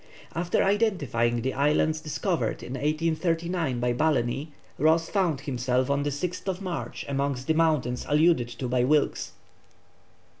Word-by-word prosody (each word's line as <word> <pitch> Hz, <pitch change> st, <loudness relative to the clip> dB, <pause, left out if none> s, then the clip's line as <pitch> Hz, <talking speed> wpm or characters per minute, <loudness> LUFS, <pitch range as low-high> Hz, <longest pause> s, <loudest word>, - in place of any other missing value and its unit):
After 170 Hz, +1 st, +1 dB
identifying 145 Hz, -, +1 dB
the 130 Hz, -, -1 dB
islands 150 Hz, +3 st, +2 dB
discovered 170 Hz, +3 st, -2 dB
in 125 Hz, -, -6 dB
1839 165 Hz, 0 st, 0 dB
by 120 Hz, 0 st, +1 dB
Balleny, 135 Hz, 0 st, 0 dB, 0.3 s
Ross 160 Hz, +3 st, +3 dB
found 175 Hz, -9 st, +1 dB
himself 130 Hz, -1 st, 0 dB
on 140 Hz, 0 st, +1 dB
the 145 Hz, -, 0 dB
6th 180 Hz, +5 st, -3 dB
March 170 Hz, -, -5 dB
amongst 140 Hz, -2 st, -1 dB
the 160 Hz, -, +2 dB
mountains 155 Hz, -7 st, +1 dB
alluded 150 Hz, -4 st, +4 dB
to 120 Hz, +2 st, -5 dB
by 125 Hz, 0 st, +1 dB
Wilkes. 150 Hz, +3 st, +1 dB
150 Hz, 135 wpm, -27 LUFS, 125-165 Hz, 0.3 s, alluded